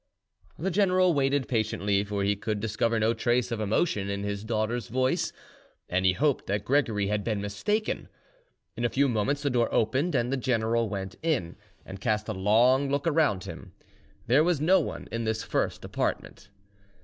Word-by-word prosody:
The 190 +5 -2
general 185 -1 +3
waited 140 -1 +1
patiently, 105 -3 0
for 100 -1 -2
he 100 +1 +2
could 105 +1 -3
discover 115 +2 0
no 110 +1 +2
trace 120 +1 0
of 115 - -2
emotion 105 - 0
in 100 0 -3
his 100 0 -3
daughter's 110 +1 -2
voice, 130 +2 0 0.6
and 95 +1 +1
he 90 - +4
hoped 140 +6 0
that 100 +1 -1
Gregory 115 -6 +1
had 105 +1 -1
been 110 -2 -1
mistaken. 205 - -2 0.7
In 120 - -4
a 120 - +2
few 140 +3 +2
moments 135 +5 0
the 140 - +1
door 120 -2 +1
opened, 135 +9 +1
and 125 +1 +1
the - - +1
general 115 -3 0
went 95 -1 -5
in, 140 - -1 0.3
and 95 0 -9
cast 105 -2 0
a 110 - -2
long 120 +8 +3
look 140 +1 -1
around 150 - +2
him; 95 - -9 0.5
there 130 +6 +4
was 175 -3 +1
no 175 +6 +4
one - - -5
in 115 0 -2
this 110 0 -1
first - - -2
apartment. 100 - -3
115 Hz, 180 wpm, -27 LUFS, 105-140 Hz, 0.7 s, he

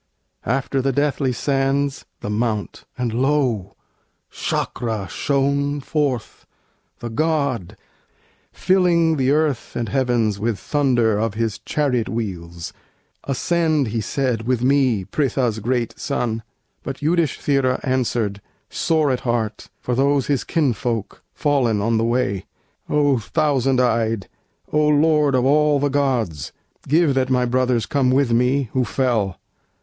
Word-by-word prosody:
After 135 +2 0
the 135 +1 +1
deathly 140 -1 0
sands, 135 +2 0 0.2
the - - -4
Mount; 110 -1 -2
and 120 -3 -2
lo! 125 -7 0 0.6
Sâkra 110 -5 -2
shone 140 +6 0
forth, 140 -4 -2 0.5
the 120 - -6
God, 140 - -1 0.7
filling 170 -4 +2
the 130 -1 +1
earth 150 -3 0
And 115 -3 -2
heavens 115 -4 +1
with 110 0 -1
thunder 120 - +1
of 110 -1 -1
his 115 -3 -2
chariot 130 -6 -1
wheels. 90 -5 -5 0.5
"Ascend," 155 0 +1
he 115 +1 -2
said, 120 0 -1
"with 125 -2 +1
me, 130 -7 +2
Pritha's 125 -1 0
great 120 +1 -1
son!" 120 -5 -2 0.4
But 135 -1 -6
Yudhisthira 145 -5 +1
answered, 120 -6 -1 0.3
sore 155 -4 +1
at 125 - 0
heart 115 -3 -2
For 125 - -3
those 140 +1 +2
his 140 -4 0
kinsfolk, 120 - -1
fallen 135 -8 +1
on 115 +2 +1
the - - +1
way: 115 -5 0 0.4
"O 145 -4 +3
Thousand 135 +2 +1
eyed, 115 -4 +1 0.5
O 150 0 +3
Lord 150 -1 +3
of 125 0 +2
all 150 +1 +3
the 145 +1 +1
gods, 125 - -1 0.4
Give 155 0 +3
that 130 -1 +1
my 125 -1 +2
brothers 125 -2 +1
come 135 0 +1
with 130 -1 +2
me, 125 +1 +2
who 130 - +2
fell! 115 -8 0
130 Hz, 130 wpm, -21 LUFS, 115-140 Hz, 0.7 s, O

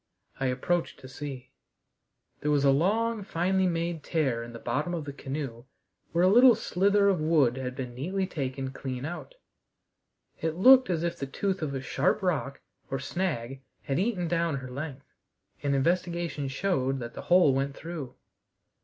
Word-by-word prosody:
I 135 - +1
approached 165 +7 -1
to 130 - -10
see. 130 -1 -7 0.9
There 150 - -2
was 145 -1 +3
a 135 - +6
long, 215 +9 +1
finely 190 0 +1
made 170 -1 -1
tear 135 -8 0
in 120 0 -8
the 115 - -8
bottom 145 +10 -2
of 160 -3 -4
the 140 - -6
canoe 135 -4 -5 0.5
where 170 +1 +2
a - - +6
little 240 +4 +7
slither 200 -1 +2
of 190 -5 +2
wood 155 -6 +3
had 130 -1 -4
been 125 -2 -5
neatly 185 +10 -2
taken 135 -6 -4
clean 130 -1 -5
out; 175 - -7 1.0
it 160 -1 -1
looked 255 +7 +7
as 170 -2 0
if 170 - -1
the 135 - -4
tooth 190 +7 -2
of 145 -3 -2
a 135 - -3
sharp 165 +8 0
rock 140 -7 -1 0.3
or 135 - -1
snag 135 -4 -3 0.2
had 135 +3 -1
eaten 190 -4 0
down 170 -2 0
her 130 -1 -7
length, 140 0 -6 0.6
and 140 -1 +1
investigation 170 0 0
showed 135 -2 0
that 120 -2 -6
the - - -7
hole 175 -6 +6
went 135 +1 -1
through. 160 -6 -7
155 Hz, 170 wpm, -28 LUFS, 135-180 Hz, 1.0 s, little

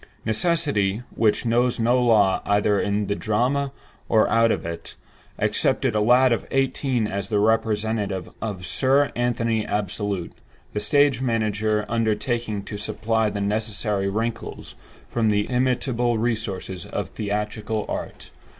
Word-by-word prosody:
Necessity, 110 - +1
which 110 +1 +2
knows 120 +1 +2
no 120 +2 +3
law, 105 -5 +4
either 105 0 +2
in 100 +1 0
the 100 - -1
drama 125 +7 0 0.4
or 110 -1 +4
out 115 +1 +4
of - - -2
it, 85 0 -6 0.4
accepted - - +1
a 105 - +1
lad 125 +4 +5
of 115 - -3
eighteen 135 -3 0
as 100 -1 -4
the 105 - +1
representative 105 -3 0
of 100 -5 -4
"Sir 135 +8 +3
Anthony 115 -2 0
Absolute"; 100 -2 -2 0.4
the 105 - -1
stage 135 +4 +3
manager 110 -3 0
undertaking 115 -1 -1
to 105 - -7
supply 110 +1 0
the 100 0 -4
necessary 105 -1 -1
wrinkles 115 +3 -4 0.3
from 115 -2 +1
the 105 0 +2
illimitable 125 -1 +1
resources 105 -5 -3
of - - -4
theatrical 105 +1 -3
art. - - -6
110 Hz, 130 wpm, -23 LUFS, 105-120 Hz, 0.4 s, lad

